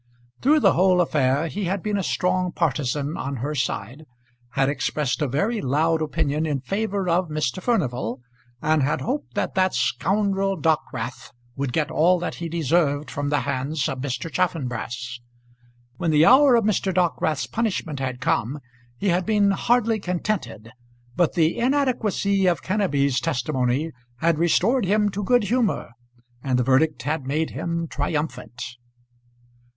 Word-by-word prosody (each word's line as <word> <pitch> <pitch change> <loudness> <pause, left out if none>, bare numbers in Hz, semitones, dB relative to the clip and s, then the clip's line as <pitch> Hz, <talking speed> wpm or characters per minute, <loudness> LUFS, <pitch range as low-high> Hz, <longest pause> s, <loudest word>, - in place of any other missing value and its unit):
Through 300 +3 +4
the - - +5
whole 185 +1 +4
affair 145 -3 +2
he 200 +4 -3
had 185 +1 -2
been 210 -1 -1
a 200 - 0
strong 180 0 0
partisan 145 -2 -1
on 140 +1 -3
her 135 +5 -3
side, 135 +2 -3 0.5
had 135 -1 +2
expressed 145 -1 -1
a 150 - +2
very 200 - 0
loud 160 +5 +1
opinion 150 +1 -1
in 145 -3 -1
favour 200 - -2
of 175 0 +1
Mr. 155 +1 -2
Furnival, 125 - -1 0.4
and 155 0 +3
had 140 +3 0
hoped 275 +5 -3
that - - -1
that 185 -1 +2
scoundrel 195 -1 0
Dockwrath 130 -6 -2 0.3
would 135 -2 -2
get 150 +3 -1
all 180 +4 +4
that 175 - -3
he 170 - -3
deserved 155 -2 +1
from 145 0 -2
the 145 0 +1
hands 140 +2 -2
of 130 - -4
Mr. 145 +4 -4
Chaffanbrass. 125 -8 -2 0.8
When 165 - -1
the 155 0 +5
hour 265 +4 +7
of 230 - +3
Mr. 200 -2 +1
Dockwrath's 170 -4 0
punishment 190 - -2
had 130 -2 -3
come 130 +5 0 0.4
he 200 - 0
had 180 +1 +2
been 205 0 +3
hardly 230 +2 +2
contented, 175 - -3 0.4
but 175 - +2
the 165 -1 +2
inadequacy 235 -7 +1
of 170 -5 +1
Kenneby's 145 -10 +1
testimony 130 +4 -1 0.3
had 165 +3 +1
restored 200 +8 +2
him 210 +2 +2
to 205 +1 -4
good 245 +3 +3
humour, 225 - 0 0.5
and 130 -2 +1
the 125 - +2
verdict 140 +5 +2
had 150 -3 -2
made 155 +3 -1
him 170 -1 -3
triumphant. 145 -5 -3
160 Hz, 155 wpm, -23 LUFS, 140-195 Hz, 0.8 s, hour